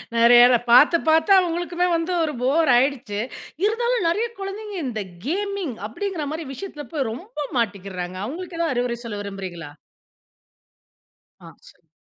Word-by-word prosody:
நெறையாத 240 Hz, +1 st, +7 dB
பாத்து, 270 Hz, +8 st, +7 dB
பாத்து 320 Hz, +4 st, +4 dB
அவங்களுக்குமே 350 Hz, 0 st, 0 dB
வந்து 330 Hz, +2 st, -1 dB
ஒரு 300 Hz, -, -2 dB
போர் 285 Hz, +5 st, +2 dB
ஆயிடுச்சு. 245 Hz, -5 st, 0 dB, 0.5 s
இருந்தாலும் 475 Hz, -1 st, +1 dB
நறையா 440 Hz, +8 st, 0 dB
குழந்தைங்க, 405 Hz, +2 st, -6 dB
இந்த 220 Hz, -4 st, -3 dB, 0.2 s
கேமிங் 390 Hz, -, -2 dB
அப்டிங்கற 355 Hz, -, -4 dB
மாரி 320 Hz, -1 st, -5 dB
விஷயத்துல 300 Hz, -4 st, -7 dB
போய் 270 Hz, -7 st, -1 dB
ரொம்ப 300 Hz, -, -6 dB
மாட்டிக்கிறாங்க, 190 Hz, -4 st, -3 dB
அவங்களுக்கு 335 Hz, +6 st, -6 dB
ஏதாவது 325 Hz, -5 st, +1 dB
அறிவுரை 245 Hz, -1 st, -1 dB
சொல்ல 210 Hz, -3 st, -5 dB
விரும்புறீங்களா? 185 Hz, -6 st, -7 dB, 1.7 s
ஆ -, -, -11 dB, 0.2 s
சொல் -, -, -23 dB
300 Hz, 130 wpm, -23 LUFS, 235-360 Hz, 1.7 s, நெறையாத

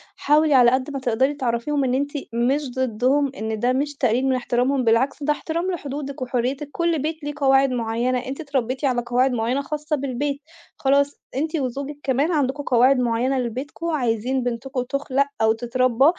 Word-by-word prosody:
حاولي 300 Hz, +1 st, +3 dB
على 245 Hz, -2 st, +6 dB
قد 260 Hz, +2 st, 0 dB
ما 275 Hz, -, -3 dB
تقدَري 260 Hz, +2 st, +1 dB
تعرّفيهم 270 Hz, +1 st, -1 dB
إن 255 Hz, -1 st, 0 dB
أنتِ 280 Hz, +2 st, 0 dB, 0.2 s
مش 260 Hz, +4 st, 0 dB
ضِدُّهم، 260 Hz, +3 st, +1 dB
إن 220 Hz, 0 st, -3 dB
ده 250 Hz, +2 st, +2 dB
مش 290 Hz, +2 st, -1 dB
تقليل 250 Hz, -1 st, +1 dB
من 265 Hz, -1 st, +2 dB
إحترامهم، 255 Hz, +2 st, 0 dB
بالعكس 255 Hz, +5 st, +2 dB
ده 300 Hz, -, +2 dB
إحترام 335 Hz, +5 st, -3 dB
لحدودِك 280 Hz, -4 st, -5 dB
وحرّيتِك. 255 Hz, +3 st, -2 dB
كل 340 Hz, -1 st, 0 dB
بيت 310 Hz, 0 st, -3 dB
ليه 295 Hz, -, -3 dB
قواعد 270 Hz, -1 st, +4 dB
مُعيّنة، 240 Hz, +1 st, 0 dB
أنتِ 270 Hz, +4 st, -5 dB
اتربيتِ 265 Hz, -2 st, -2 dB
على 250 Hz, -3 st, +1 dB
قواعد 250 Hz, +2 st, +2 dB
مُعيّنة 245 Hz, +3 st, 0 dB
خاصّة 300 Hz, +1 st, -2 dB
بالبيت، 280 Hz, +1 st, -3 dB, 0.4 s
خلاص 280 Hz, +1 st, +2 dB, 0.2 s
أنتِ 310 Hz, +4 st, -1 dB
وزوجِك 280 Hz, +1 st, -3 dB
كمان 275 Hz, +5 st, +1 dB
عندكم 285 Hz, -2 st, 0 dB
قواعد 255 Hz, +1 st, +4 dB
معينة 250 Hz, +2 st, +1 dB
لبيتكم، 260 Hz, +7 st, -4 dB
عايزين 250 Hz, -2 st, 0 dB
بنتكم 245 Hz, +2 st, -3 dB
تُخلَق 275 Hz, +1 st, 0 dB, 0.2 s
أو 220 Hz, 0 st, +4 dB
تتربى 245 Hz, +2 st, +1 dB
265 Hz, 170 wpm, -22 LUFS, 245-285 Hz, 0.4 s, على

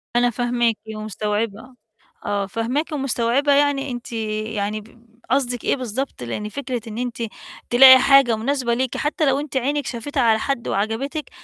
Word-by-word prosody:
أنا 245 Hz, 0 st, +4 dB
فاهماكِ 240 Hz, -1 st, 0 dB, 0.2 s
ومستوعبة. 215 Hz, +3 st, -3 dB, 0.5 s
آه، 205 Hz, -1 st, -1 dB
فاهماكِ 245 Hz, -, -2 dB
ومستوعبة، 270 Hz, 0 st, +1 dB
يعني 280 Hz, -1 st, +2 dB
أنتِ 240 Hz, 0 st, -7 dB
يعني 215 Hz, -1 st, -3 dB
ب 230 Hz, +2 st, -20 dB, 0.3 s
قصدك 250 Hz, -3 st, 0 dB
إيه -, -, +2 dB
بالضبط، 255 Hz, -, -4 dB
لإن 210 Hz, -, -4 dB
فكرة 255 Hz, -2 st, -4 dB
إن 215 Hz, -, -7 dB
أنتِ 240 Hz, -1 st, -3 dB, 0.5 s
تلاقي 260 Hz, +1 st, +9 dB
حاجة 275 Hz, -3 st, +5 dB
مناسبة 245 Hz, +1 st, -1 dB
ليكِ 255 Hz, 0 st, -1 dB
حتّى 305 Hz, +1 st, 0 dB
لو 270 Hz, 0 st, +2 dB
أنتِ 290 Hz, -2 st, -4 dB
عينِك 285 Hz, +2 st, -1 dB
شافتها 265 Hz, +3 st, -3 dB
على 220 Hz, -1 st, +4 dB
حد 275 Hz, -4 st, -2 dB
وعجبتِك، 230 Hz, +10 st, -2 dB
245 Hz, 150 wpm, -21 LUFS, 220-275 Hz, 0.5 s, تلاقي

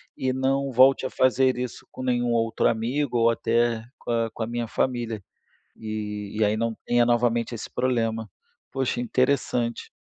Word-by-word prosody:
e 130 Hz, -, -1 dB
não 135 Hz, +1 st, 0 dB
volte 130 Hz, +2 st, +5 dB
a -, -, -1 dB
fazer 130 Hz, 0 st, +2 dB
isso 125 Hz, -1 st, -5 dB
com -, -, -8 dB
nenhum 120 Hz, -1 st, 0 dB
outro 115 Hz, -1 st, +2 dB
amigo 120 Hz, +4 st, -1 dB
ou 115 Hz, 0 st, +4 dB
até 115 Hz, 0 st, +1 dB, 0.2 s
com -, -, -5 dB
a 115 Hz, -1 st, +1 dB
com 115 Hz, -, -4 dB
a -, -, -3 dB
minha 120 Hz, 0 st, -2 dB
família, 115 Hz, -3 st, -1 dB, 0.6 s
e 105 Hz, -1 st, -5 dB
e 110 Hz, -, +4 dB
aí 105 Hz, +1 st, +2 dB
não 115 Hz, +1 st, 0 dB
tenha 120 Hz, 0 st, +4 dB
novamente 120 Hz, 0 st, +1 dB
esse 115 Hz, -, -6 dB
problema. 115 Hz, -3 st, -1 dB, 0.4 s
Poxa, 135 Hz, -2 st, -1 dB
interessante. 125 Hz, -1 st, 0 dB
120 Hz, 170 wpm, -25 LUFS, 115-130 Hz, 0.6 s, volte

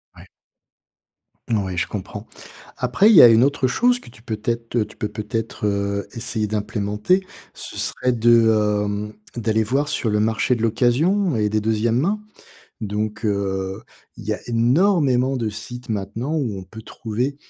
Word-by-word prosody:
Ouais. -, -, -14 dB, 1.2 s
Ouais, 95 Hz, -5 st, 0 dB
je 90 Hz, +3 st, 0 dB
comprends. 105 Hz, +1 st, -6 dB, 0.5 s
Après, 125 Hz, -, +3 dB
il 225 Hz, -, +6 dB
y -, -, +12 dB
a -, -, +11 dB
une 115 Hz, +1 st, +6 dB
autre 140 Hz, -1 st, +2 dB
chose 245 Hz, -, +2 dB
que -, -, -14 dB
tu 115 Hz, -, -17 dB
peux 110 Hz, -2 st, -4 dB
t'être, 115 Hz, +2 st, -3 dB
heu 110 Hz, -, +2 dB
tu -, -, -16 dB
peux 105 Hz, -2 st, -3 dB
peut-être, 110 Hz, 0 st, -4 dB
heu, 100 Hz, 0 st, -1 dB
essayer 115 Hz, -2 st, -2 dB
d'implémenter, 105 Hz, -, 0 dB, 0.3 s
ce -, -, -9 dB
serait 125 Hz, -, 0 dB
de, 115 Hz, -1 st, +5 dB, 0.4 s
hem, 105 Hz, +1 st, -3 dB, 0.2 s
d'aller 110 Hz, -1 st, +1 dB
voir 135 Hz, +7 st, 0 dB
sur 120 Hz, -, -1 dB
le 105 Hz, 0 st, +1 dB
marché 110 Hz, +3 st, +1 dB
de 115 Hz, -, -5 dB
l'occasion 130 Hz, -, +2 dB
et 105 Hz, -1 st, +1 dB
des 110 Hz, +1 st, +1 dB
2e 110 Hz, +2 st, +1 dB
main. 200 Hz, +9 st, 0 dB, 0.6 s
Donc, 105 Hz, +1 st, -3 dB
heu, 95 Hz, -2 st, -2 dB, 0.3 s
il -, -, -11 dB
y -, -, -2 dB
a -, -, -5 dB
énormément 130 Hz, -, +2 dB
de 115 Hz, -4 st, -1 dB
sites 120 Hz, +4 st, -8 dB
maintenant 110 Hz, +7 st, -3 dB
où 125 Hz, -11 st, -1 dB
on 95 Hz, -, -7 dB
peut 110 Hz, +5 st, -11 dB
trouver 120 Hz, +5 st, -3 dB
115 Hz, 170 wpm, -22 LUFS, 105-125 Hz, 1.2 s, y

